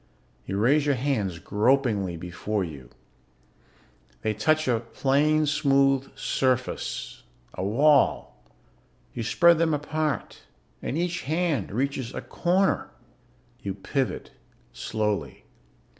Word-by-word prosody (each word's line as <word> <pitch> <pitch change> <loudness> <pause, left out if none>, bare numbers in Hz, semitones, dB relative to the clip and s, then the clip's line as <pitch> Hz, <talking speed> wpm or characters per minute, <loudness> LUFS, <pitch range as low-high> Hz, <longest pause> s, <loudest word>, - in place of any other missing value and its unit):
You 95 - -2
raise 140 +8 +3
your 140 - +3
hands 115 -9 -1
gropingly 105 -3 +1
before 90 +4 -3
you. 70 -8 -8 1.3
They 110 - +1
touch 155 +8 +1
a 120 -3 +2
plain 145 +6 +1
smooth 135 -2 +2
surface, 130 -1 -1 0.3
a - - -4
wall. 110 - +2 0.7
You 120 - -4
spread 170 +8 +4
them 160 -2 +2
apart 150 0 -2 0.4
and 140 - -3
each 175 +1 -1
hand 160 0 -1
reaches 130 +2 -2
a - - -3
corner. 185 +3 +1 0.7
You 95 -2 -4
pivot 130 +7 -3 0.4
slowly. 105 -2 -3
135 Hz, 105 wpm, -26 LUFS, 105-150 Hz, 1.3 s, spread